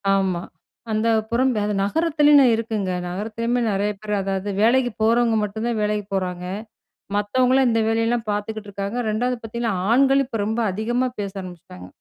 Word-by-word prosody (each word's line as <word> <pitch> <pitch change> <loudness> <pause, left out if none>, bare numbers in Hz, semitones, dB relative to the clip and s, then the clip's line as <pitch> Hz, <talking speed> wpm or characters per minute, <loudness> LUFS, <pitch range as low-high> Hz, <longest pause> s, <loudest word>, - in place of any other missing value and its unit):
ஆமா. 190 -3 0 0.5
அந்த 220 +1 +1 0.2
புறம் 255 +3 +2 0.3
நகரத்திலேயனு 295 +2 +4
இருக்குங்க 220 -4 -2 0.2
நகரத்திலேயுமே 225 +6 -2
நெறைய 200 +1 0
பேர் 210 -1 -3
அதாவது 195 +1 -2
வேலைக்கு 245 +2 +3
போறவங்க 230 0 +3
மட்டும் 220 +3 -4
தான் 230 -2 -1
வேலைக்கு 210 -1 -1
போறாங்க. 180 -1 -3 0.7
மத்தவங்கலாம் 255 +5 +2
இந்த 225 0 +2
வேலையெல்லாம் 225 0 0
பார்த்துக்குட்டு 210 0 -4
இருக்காங்க. 200 +4 -4
2வது 245 +3 0
பார்த்தீங்கன்னா, 225 -1 -2 0.2
ஆண்கள் 270 +2 +4
இப்ப 225 -5 -4
ரொம்ப 220 +2 -2
அதிகமா 240 +6 0
பேச 200 -1 -4
ஆரம்பிச்சுட்டாங்க. 165 - -11
220 Hz, 140 wpm, -22 LUFS, 205-240 Hz, 0.7 s, நகரத்திலேயனு